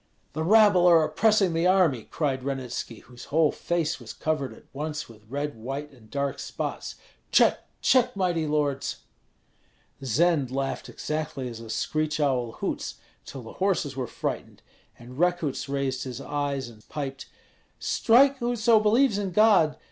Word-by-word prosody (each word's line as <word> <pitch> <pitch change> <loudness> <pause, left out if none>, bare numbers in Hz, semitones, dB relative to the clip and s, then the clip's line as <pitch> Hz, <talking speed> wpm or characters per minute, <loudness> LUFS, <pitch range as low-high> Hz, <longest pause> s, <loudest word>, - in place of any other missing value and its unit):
"The 155 - -3
rabble 200 -1 +6
are 165 -2 +6
oppressing 195 +3 +2
the 165 +2 +2
army!" 175 - +3
cried 135 -4 -1
Ranitski, 130 -4 -4
whose 125 -1 -12
whole 155 0 +3
face 170 -4 -2
was 120 -3 -9
covered 155 -4 -2
at - - -14
once 150 +1 -4
with 110 -2 -17
red, 145 +2 -3
white, 135 +6 -6
and 115 -5 -19
dark 140 +1 -2
spots. - - -5 0.4
"Check, - - +3
check! 250 -1 +3
mighty 175 -5 0
lords!" 145 -2 -1 1.0
Zend 145 +2 +2
laughed 135 +1 -3
exactly 150 -4 -4
as 115 -2 -7
a 115 -1 -10
screech 155 +7 -1
owl 125 -5 0
hoots, - - -4 0.3
till 135 - -8
the 115 - -10
horses 175 -8 +1
were 130 -2 -3
frightened; - - -5 0.3
and 125 +3 -12
Rekuts 175 -6 0
raised 135 -2 -1
his 130 -1 -6
eyes 140 -2 -2
and 110 -2 -16
piped, 135 -2 -5 0.5
"Strike, 265 +4 +4
whoso 235 -2 +3
believes 215 +1 +3
in 200 -2 -2
God! 185 -6 +4
150 Hz, 150 wpm, -26 LUFS, 130-180 Hz, 1.0 s, rabble